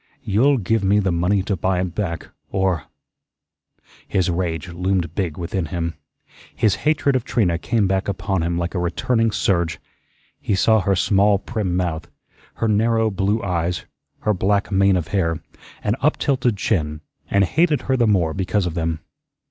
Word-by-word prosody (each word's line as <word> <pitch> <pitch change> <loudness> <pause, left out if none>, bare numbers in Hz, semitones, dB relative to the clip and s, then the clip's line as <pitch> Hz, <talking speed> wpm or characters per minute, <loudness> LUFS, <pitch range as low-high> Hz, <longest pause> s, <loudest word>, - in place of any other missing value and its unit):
You'll 130 +8 +3
give 110 0 0
me 100 +2 +3
the 95 -3 +2
money 90 +3 +1
to 100 0 -1
buy 95 +1 0
it 90 -2 -2
back, 90 -5 -3 0.2
or 95 -5 0 0.6
" - - -66 0.5
His 95 -2 +1
rage 85 0 -2
loomed 90 -1 -1
big 85 -5 -2
within 85 0 -2
him. 85 0 -3 0.6
His 110 - +3 0.2
hatred 140 -3 +2
of 130 - +1
Trina 90 -10 +1
came 115 +2 +1
back 95 0 0
upon 95 -2 -1
him 85 +1 -1
like 85 0 -2
a 90 - -1
returning 115 +7 +1
surge. 85 -6 0 0.6
He 100 - 0
saw 110 +3 +4
her 100 0 +1
small, 100 +2 +3
prim 100 -4 -2
mouth, 85 -3 -2 0.5
her 115 - -1
narrow 110 +1 +2
blue 100 +3 0
eyes, 90 -2 -1 0.4
her 105 - +2
black 100 +2 0
mane 100 0 +4
of 85 -3 -3
hair, 85 -5 0 0.4
and 105 - +1
up 150 +3 +2
tilted 125 -6 +1
chin, 75 -7 -1 0.3
and 100 0 +3
hated 155 - +2
her 130 - +1
the 120 -3 +2
more 90 -6 +2
because 95 +1 0
of 85 - -2
them. 80 -1 -2
95 Hz, 170 wpm, -21 LUFS, 85-105 Hz, 0.6 s, saw